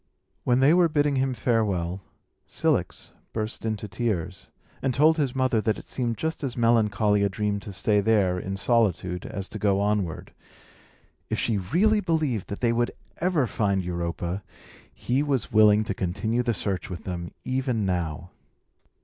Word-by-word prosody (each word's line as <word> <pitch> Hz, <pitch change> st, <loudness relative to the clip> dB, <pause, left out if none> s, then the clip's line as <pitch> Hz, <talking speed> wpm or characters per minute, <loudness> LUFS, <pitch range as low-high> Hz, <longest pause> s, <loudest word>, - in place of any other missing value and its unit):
When 125 Hz, +1 st, +3 dB
they 140 Hz, +4 st, +6 dB
were 175 Hz, -1 st, +4 dB
bidding 145 Hz, -2 st, +1 dB
him 130 Hz, -1 st, 0 dB
farewell, 100 Hz, -6 st, 0 dB, 0.5 s
Cilix -, -, -1 dB, 0.2 s
burst 110 Hz, 0 st, -4 dB
into 110 Hz, -1 st, -3 dB
tears, 95 Hz, -4 st, -3 dB, 0.3 s
and 130 Hz, -2 st, 0 dB
told 155 Hz, +3 st, +5 dB
his 140 Hz, -5 st, 0 dB
mother 130 Hz, -4 st, +2 dB
that 110 Hz, -1 st, 0 dB
it -, -, -11 dB
seemed 120 Hz, -3 st, -2 dB
just 160 Hz, 0 st, -3 dB
as 130 Hz, -3 st, -3 dB
melancholy 105 Hz, -3 st, +3 dB
a 100 Hz, -, +2 dB
dream 105 Hz, +1 st, -1 dB
to 100 Hz, -, -9 dB
stay 105 Hz, +2 st, +2 dB
there, 100 Hz, -4 st, +2 dB
in 95 Hz, +2 st, -4 dB
solitude, 100 Hz, -5 st, +1 dB
as 100 Hz, -1 st, -5 dB
to 110 Hz, -, -6 dB
go 100 Hz, -1 st, +2 dB
onward. 100 Hz, -5 st, -1 dB, 1.0 s
If -, -, -1 dB
she 110 Hz, -4 st, 0 dB
really 195 Hz, -, +2 dB
believed 155 Hz, -, -1 dB
that 100 Hz, -, -6 dB
they 120 Hz, -1 st, +3 dB
would 120 Hz, 0 st, +1 dB, 0.3 s
ever 170 Hz, -5 st, +1 dB
find 100 Hz, -5 st, 0 dB
Europa, 85 Hz, +1 st, -3 dB, 0.5 s
he 130 Hz, +3 st, -1 dB
was 140 Hz, -6 st, -1 dB
willing 105 Hz, 0 st, +6 dB
to 105 Hz, -, -2 dB
continue 110 Hz, +7 st, -1 dB
the 120 Hz, -2 st, 0 dB
search 95 Hz, -1 st, -3 dB
with 90 Hz, -, -7 dB
them, 85 Hz, -2 st, -5 dB
even 130 Hz, -5 st, 0 dB
now. 85 Hz, -2 st, -2 dB
110 Hz, 165 wpm, -26 LUFS, 95-125 Hz, 1.0 s, they